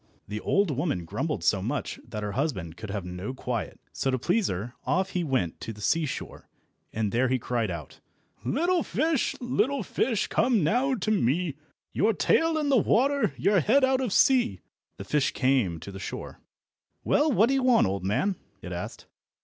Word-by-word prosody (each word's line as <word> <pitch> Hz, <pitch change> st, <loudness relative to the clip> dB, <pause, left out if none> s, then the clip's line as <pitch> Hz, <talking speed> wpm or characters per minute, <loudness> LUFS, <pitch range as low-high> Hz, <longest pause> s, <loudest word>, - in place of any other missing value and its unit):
The 105 Hz, +1 st, -4 dB
old 195 Hz, -, +1 dB
woman 140 Hz, -, -1 dB
grumbled -, -, -3 dB
so -, -, +2 dB
much -, -, -3 dB
that 105 Hz, -1 st, -5 dB
her 105 Hz, -, -2 dB
husband 100 Hz, -, -2 dB
could 110 Hz, +2 st, -8 dB
have 100 Hz, -2 st, -4 dB
no 90 Hz, +8 st, -5 dB
quiet, 125 Hz, -4 st, -4 dB
so 135 Hz, -, -1 dB
to 130 Hz, -, +1 dB
please 180 Hz, -, +1 dB
her 105 Hz, +7 st, -4 dB
off 190 Hz, +1 st, 0 dB
he 180 Hz, -, -1 dB
went 130 Hz, -, -1 dB
to 115 Hz, -, -5 dB
the 105 Hz, -, -14 dB
seashore, 155 Hz, +7 st, -2 dB, 0.4 s
and 105 Hz, -2 st, -1 dB
there 125 Hz, +3 st, +2 dB
he 130 Hz, +1 st, +1 dB
cried 120 Hz, -3 st, -1 dB
out— 80 Hz, -6 st, -7 dB, 0.4 s
"Little 340 Hz, -, +1 dB
fish, 315 Hz, -4 st, 0 dB
little 250 Hz, +2 st, 0 dB
fish, 230 Hz, -5 st, 0 dB
come 230 Hz, -5 st, +2 dB
now 250 Hz, -, +2 dB
to 215 Hz, -1 st, -1 dB
me, 170 Hz, -, +1 dB, 0.4 s
Your 220 Hz, +3 st, +2 dB
tail 325 Hz, +9 st, +2 dB
in 300 Hz, -2 st, 0 dB
the 270 Hz, -, +5 dB
water, 275 Hz, +6 st, +2 dB
your 200 Hz, -1 st, +3 dB
head 250 Hz, -, +3 dB
out 260 Hz, 0 st, +3 dB
of 250 Hz, -5 st, -1 dB
sea!" 245 Hz, -, +3 dB, 0.4 s
The -, -, -6 dB
fish 145 Hz, +4 st, +1 dB
came 130 Hz, -11 st, +1 dB
to 100 Hz, -, -8 dB
the 95 Hz, -, -8 dB
shore. -, -, -6 dB, 0.6 s
"Well, 300 Hz, +1 st, +3 dB
what 220 Hz, -3 st, +5 dB
do 270 Hz, -, +1 dB
you 270 Hz, -, +2 dB
want, 250 Hz, -2 st, +4 dB
old 95 Hz, -1 st, -2 dB
man?" 185 Hz, -, 0 dB, 0.3 s
it 90 Hz, -, -6 dB
asked. 90 Hz, 0 st, -6 dB
155 Hz, 190 wpm, -27 LUFS, -, 0.6 s, the